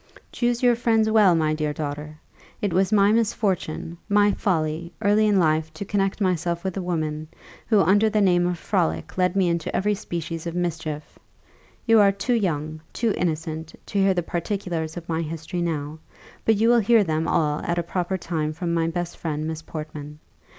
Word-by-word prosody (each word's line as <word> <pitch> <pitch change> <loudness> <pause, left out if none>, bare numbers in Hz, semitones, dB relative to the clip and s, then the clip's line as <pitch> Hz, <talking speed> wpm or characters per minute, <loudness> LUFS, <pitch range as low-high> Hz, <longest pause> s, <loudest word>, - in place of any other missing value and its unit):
"Choose 240 0 0
your 245 -1 +5
friends 225 -2 +2
well, 205 -5 +5
my 155 -1 +1
dear 155 -1 -1
daughter! 150 0 -5 0.4
It 200 -4 -1
was 190 +3 +2
my 205 -1 +5
misfortune, 200 -7 -1
my 205 0 +4
folly, 170 -4 -1
early 215 0 +3
in 205 -2 +3
life 160 -2 +2
to 200 - -5
connect 195 0 0
myself 175 -3 0
with 190 -2 -3
a 195 - -2
woman, 155 -3 -2 0.4
who 215 -4 +4
under 205 +3 +4
the 215 0 +1
name 175 -3 +3
of 180 -1 -1
frolic 80 - -1
led 180 0 +1
me 190 -2 +3
into 170 -1 -1
every 210 +2 +2
species 170 -4 -5
of 170 - -4
mischief. 160 -4 -4 0.7
You 225 -1 +5
are 200 -1 +6
too 200 +6 -1
young, 155 -8 -1
too 230 -3 0
innocent, 160 -1 -3
to 200 - -2
hear 195 -1 +3
the 175 - 0
particulars 170 -2 -3
of 170 - -7
my 165 0 -1
history 165 +2 -4
now; 155 -2 -3 0.5
but 225 - +4
you 220 +3 +2
will 240 0 +6
hear 225 0 +4
them 160 -2 -1
all 150 -3 +1
at 170 - -2
a 175 - 0
proper 180 +2 -2
time 155 -3 -2
from 170 +1 -3
my 165 -1 +1
best 175 +1 -3
friend, 155 -2 -3
Miss 160 0 -4
Portman. 150 -2 -7
175 Hz, 190 wpm, -24 LUFS, 160-200 Hz, 0.7 s, are